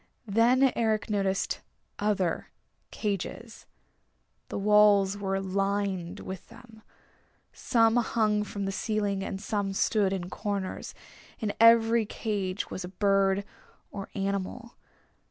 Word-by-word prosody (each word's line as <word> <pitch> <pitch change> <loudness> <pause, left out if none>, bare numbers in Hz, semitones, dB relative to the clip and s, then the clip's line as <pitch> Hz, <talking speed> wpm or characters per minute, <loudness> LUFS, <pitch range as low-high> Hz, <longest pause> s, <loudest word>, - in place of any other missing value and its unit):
Then 240 +5 +4
Eric 220 -1 0
noticed 195 -2 0 0.4
other 200 -5 0 0.4
cages. 215 +3 -5 0.8
The - - -4
walls 205 -1 +5
were 195 -1 -2
lined 195 -2 -2
with 190 -2 -7
them. 230 -1 -15 0.7
Some 225 -1 +3
hung 215 -3 +1
from 200 -1 -5
the 195 - -1
ceiling, 200 -1 -1
and 190 - -4
some 200 -1 -2
stood 200 0 +2
in 185 -2 -4
corners. 200 -2 -4 0.4
In 210 -3 -2
every 230 -1 +6
cage 200 -4 -3
was 185 - -4
a - - -5
bird 195 0 +2 0.5
or 195 -1 -7
animal. 200 +4 -3
205 Hz, 115 wpm, -28 LUFS, 195-220 Hz, 0.8 s, every